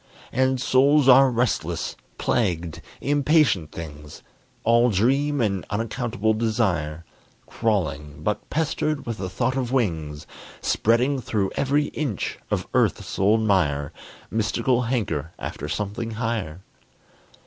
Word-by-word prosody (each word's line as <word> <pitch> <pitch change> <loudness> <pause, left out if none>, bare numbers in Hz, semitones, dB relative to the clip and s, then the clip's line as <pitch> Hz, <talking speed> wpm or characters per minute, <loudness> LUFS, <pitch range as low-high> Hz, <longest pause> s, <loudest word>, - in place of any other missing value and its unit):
And 130 0 +1
souls 140 +3 +4
are 135 +1 +8
restless, 120 -1 -1 0.2
plagued, 85 -7 -1 0.2
impatient 145 - +2
things, 75 -2 -9 0.4
All 120 +1 +4
dream 135 +8 +2
and 100 -6 0
unaccountable 110 0 -1
desire; 95 -9 -1 0.4
Crawling, 75 -10 -2
but - - -2
pestered 155 -1 -1
with 115 -2 -4
the 95 - -3
thought 95 +7 -1
of 125 -2 -2
wings; 80 - -1 0.3
Spreading 125 +5 +2
through 100 -5 -1
every 145 +2 +1
inch 140 -10 -3
of - - -1
earth's - - 0
old 105 +4 +4
mire, 75 -10 +1 0.4
Mystical 115 +3 +1
hanker 85 - -2
after - - -6
something 105 +3 -3
higher. 110 -7 -3
115 Hz, 115 wpm, -24 LUFS, 90-130 Hz, 0.4 s, are